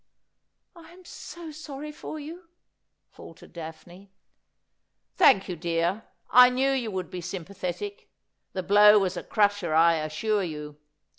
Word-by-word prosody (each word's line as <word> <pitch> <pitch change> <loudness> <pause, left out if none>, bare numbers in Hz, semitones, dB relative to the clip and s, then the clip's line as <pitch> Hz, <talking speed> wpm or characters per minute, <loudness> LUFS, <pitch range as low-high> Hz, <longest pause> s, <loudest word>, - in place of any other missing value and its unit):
' - - -54 0.3
I 330 -1 -15
am 365 0 -18
so 340 -2 -10
sorry 300 -1 -8
for 310 +1 -8
you,' 330 +4 -10 0.6
faltered - - -14
Daphne. 170 +3 -11 0.5
' - - -53
Thank 195 -8 +5
you, 180 - -4
dear. 170 +5 -2 0.3
I 250 0 +8
knew 265 +2 +1
you 255 -4 -1
would 185 -3 -5
be 180 - -6
sympathetic. 195 - -6 0.4
The 185 - -3
blow 210 +3 +6
was 190 -2 0
a 175 - -4
crusher, 205 -6 0
I 165 +1 +5
assure 160 +8 -1
you. 150 -3 -7
200 Hz, 145 wpm, -26 LUFS, 170-275 Hz, 0.6 s, I